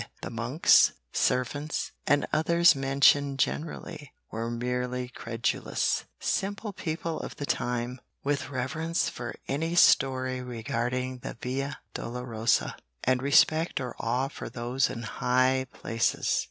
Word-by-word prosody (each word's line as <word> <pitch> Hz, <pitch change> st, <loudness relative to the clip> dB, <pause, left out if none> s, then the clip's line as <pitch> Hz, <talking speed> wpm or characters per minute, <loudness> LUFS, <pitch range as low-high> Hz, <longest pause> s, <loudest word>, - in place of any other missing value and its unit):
The -, -, -4 dB
monks, 120 Hz, +7 st, +4 dB, 0.2 s
servants 145 Hz, +4 st, 0 dB, 0.2 s
and 145 Hz, 0 st, +3 dB
others 170 Hz, +2 st, +5 dB
mentioned 140 Hz, +1 st, +3 dB
generally, 150 Hz, -1 st, -3 dB, 0.2 s
were 115 Hz, +1 st, -3 dB
merely 125 Hz, +1 st, -2 dB
credulous, 115 Hz, -1 st, -1 dB
simple 200 Hz, +2 st, -2 dB
people 165 Hz, -1 st, -3 dB
of -, -, -6 dB
the 145 Hz, -, -4 dB
time, 125 Hz, -1 st, -2 dB, 0.2 s
with 140 Hz, -1 st, -1 dB
reverence 155 Hz, +6 st, -1 dB
for 120 Hz, 0 st, -6 dB
any 160 Hz, +5 st, -1 dB
story 130 Hz, -5 st, +4 dB
regarding 125 Hz, +1 st, -3 dB
the 120 Hz, -, -7 dB
Via 135 Hz, +3 st, -3 dB
Dolorosa, 115 Hz, -2 st, -1 dB, 0.3 s
and 130 Hz, 0 st, +2 dB
respect 155 Hz, +4 st, +4 dB
or 125 Hz, -3 st, -5 dB
awe 125 Hz, +4 st, 0 dB
for 140 Hz, -, -7 dB
those 125 Hz, +2 st, 0 dB
in 115 Hz, -, -5 dB
high 130 Hz, +2 st, +1 dB
places. 115 Hz, +1 st, 0 dB
130 Hz, 120 wpm, -28 LUFS, 125-145 Hz, 0.3 s, others